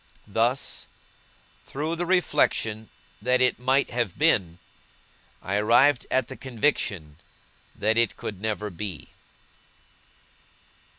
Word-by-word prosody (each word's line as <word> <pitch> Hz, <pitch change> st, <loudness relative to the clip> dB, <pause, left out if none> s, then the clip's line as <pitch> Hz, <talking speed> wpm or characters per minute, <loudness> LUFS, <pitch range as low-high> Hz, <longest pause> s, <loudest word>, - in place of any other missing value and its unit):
Thus, 115 Hz, +5 st, -1 dB, 0.8 s
through 155 Hz, +4 st, -3 dB
the 175 Hz, +1 st, -3 dB
reflection 115 Hz, -11 st, +1 dB, 0.3 s
that 125 Hz, +3 st, +2 dB
it 125 Hz, -1 st, +2 dB
might 130 Hz, +3 st, +2 dB
have 120 Hz, -7 st, -2 dB
been, 95 Hz, -, +2 dB, 0.9 s
I 100 Hz, +2 st, -1 dB
arrived 120 Hz, +5 st, +4 dB
at 130 Hz, -2 st, +1 dB
the -, -, -8 dB
conviction 105 Hz, -, -2 dB, 0.6 s
that 110 Hz, +2 st, +1 dB
it 115 Hz, -2 st, +2 dB
could 100 Hz, -3 st, -6 dB
never 105 Hz, -1 st, -3 dB
be. 90 Hz, -2 st, -7 dB
115 Hz, 105 wpm, -25 LUFS, 105-130 Hz, 0.9 s, arrived